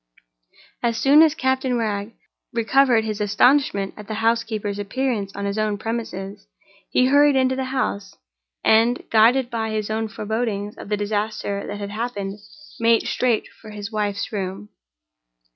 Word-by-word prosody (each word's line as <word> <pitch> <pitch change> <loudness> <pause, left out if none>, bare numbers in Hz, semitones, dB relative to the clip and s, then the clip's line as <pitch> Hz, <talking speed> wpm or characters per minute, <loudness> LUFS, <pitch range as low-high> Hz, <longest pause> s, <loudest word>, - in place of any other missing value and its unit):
As 235 -1 0
soon 280 +6 +6
as 315 -2 +5
Captain 260 -2 0
Wragge 210 -1 -2 0.4
recovered 235 0 +3
his 215 -1 -3
astonishment 205 -1 +2
at 210 -1 -11
the 220 - -4
housekeeper's 220 -2 -1
appearance 205 -1 -2
on 200 0 -4
his 200 +2 -2
own 215 -1 0
premises, 205 -3 -5 0.4
he 255 - +3
hurried 285 +2 +5
into 260 0 +2
the 265 0 -2
house, 255 -6 -3 0.5
and, 230 +3 +3
guided 240 +3 +4
by 225 -1 -2
his 215 -1 -2
own 220 0 -1
forebodings 215 -1 -3
of - - -10
the 210 - 0
disaster 205 -1 -2
that 205 - -5
had 200 0 -6
happened, 210 -3 -4 0.4
made 230 0 +3
straight 245 -3 0
for 220 - -11
his 210 0 -7
wife's 205 -2 -2
room. 190 - -4
220 Hz, 150 wpm, -22 LUFS, 205-245 Hz, 0.5 s, soon